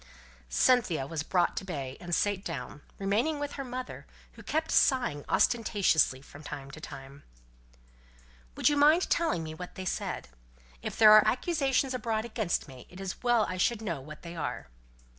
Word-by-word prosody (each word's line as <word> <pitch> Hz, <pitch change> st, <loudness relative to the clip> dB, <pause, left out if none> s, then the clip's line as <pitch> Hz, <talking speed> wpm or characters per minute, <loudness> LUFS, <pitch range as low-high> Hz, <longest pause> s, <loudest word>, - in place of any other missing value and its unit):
Cynthia 180 Hz, -, +3 dB
was 155 Hz, +2 st, -4 dB
brought 175 Hz, +2 st, +1 dB
to -, -, -2 dB
bay, 140 Hz, -8 st, -5 dB
and 175 Hz, -1 st, -1 dB
sate 205 Hz, -2 st, 0 dB
down; 125 Hz, +2 st, -6 dB, 0.2 s
remaining 215 Hz, +11 st, 0 dB
with 290 Hz, 0 st, -3 dB
her 275 Hz, -, -5 dB
mother, 255 Hz, 0 st, -7 dB, 0.2 s
who -, -, -14 dB
kept 320 Hz, +1 st, -2 dB
sighing 245 Hz, -, +2 dB
ostentatiously 195 Hz, -, +2 dB
from 145 Hz, -, -13 dB
time 140 Hz, -2 st, -8 dB
to 155 Hz, -, -11 dB
time. 135 Hz, 0 st, -10 dB, 1.4 s
"Would -, -, +2 dB
you 295 Hz, -, +3 dB
mind 305 Hz, +5 st, +4 dB
telling 320 Hz, -, +1 dB
me 155 Hz, 0 st, -6 dB
what 180 Hz, +3 st, -9 dB
they 190 Hz, -, -6 dB
said? 120 Hz, -, -3 dB, 0.5 s
If -, -, -5 dB
there 215 Hz, -1 st, +8 dB
are 215 Hz, 0 st, +8 dB
accusations 270 Hz, -2 st, +1 dB
abroad 225 Hz, -2 st, -2 dB
against 215 Hz, -9 st, -2 dB
me, 130 Hz, -2 st, -12 dB
it 180 Hz, -, -12 dB
is 195 Hz, -1 st, -4 dB
as -, -, -22 dB
well 240 Hz, -3 st, +3 dB
I 185 Hz, -, -4 dB
should 225 Hz, +4 st, +1 dB
know 170 Hz, -10 st, -3 dB
what 155 Hz, +3 st, -11 dB
they 170 Hz, 0 st, -8 dB
are. 165 Hz, -, -4 dB
195 Hz, 180 wpm, -29 LUFS, 155-250 Hz, 1.4 s, there